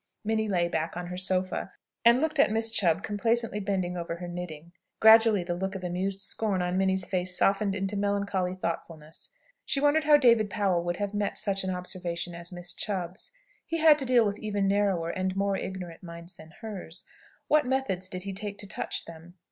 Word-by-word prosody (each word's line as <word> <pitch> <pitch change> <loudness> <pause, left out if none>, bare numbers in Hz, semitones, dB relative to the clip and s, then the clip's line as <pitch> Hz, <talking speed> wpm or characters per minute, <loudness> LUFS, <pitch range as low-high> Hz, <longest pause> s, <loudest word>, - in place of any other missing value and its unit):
Minnie 220 0 0
lay 175 -3 +2
back 160 0 -2
on 180 - -4
her 180 +1 -6
sofa, 185 0 -1 0.3
and 235 +2 +6
looked 310 0 -1
at - - +6
Miss 225 +1 +1
Chubb 175 -4 +2
complacently 225 +1 0
bending 190 -3 -2
over 170 -1 -4
her 175 +1 -7
knitting. 170 -2 -7 0.3
Gradually 220 -3 +7
the 175 0 -2
look 190 +2 -3
of 190 - -6
amused 190 +2 -2
scorn 200 -1 0
on 180 0 -1
Minnie's 190 -1 +1
face 180 -1 0
softened 195 0 +2
into 195 0 -2
melancholy 200 -2 -1
thoughtfulness. 165 -3 -6 0.3
She 275 - 0
wondered 295 +2 +3
how 300 -1 +7
David 230 -6 +4
Powell 190 -5 +1
would 175 0 -1
have 205 0 -3
met 205 -1 -1
such 195 -2 -1
an 190 - -2
observation 180 -1 -4
as 170 +1 -7
Miss 175 0 -3
Chubb's. 185 -2 -4 0.4
He 330 - -1
had 310 -2 +6
to 270 - -2
deal 245 -3 +4
with 205 0 -2
even 205 -2 -1
narrower 195 -4 +1
and 185 0 -2
more 200 0 +1
ignorant 180 -3 -6
minds 170 0 -10
than 160 -2 -14
hers. 195 -6 -7 0.4
What 300 -3 +3
method 265 -8 0
did 185 0 -5
he 195 0 -5
take 200 +1 -5
to 205 -1 -5
touch - - -3
them? 170 +2 -12
190 Hz, 195 wpm, -28 LUFS, 180-210 Hz, 0.4 s, Gradually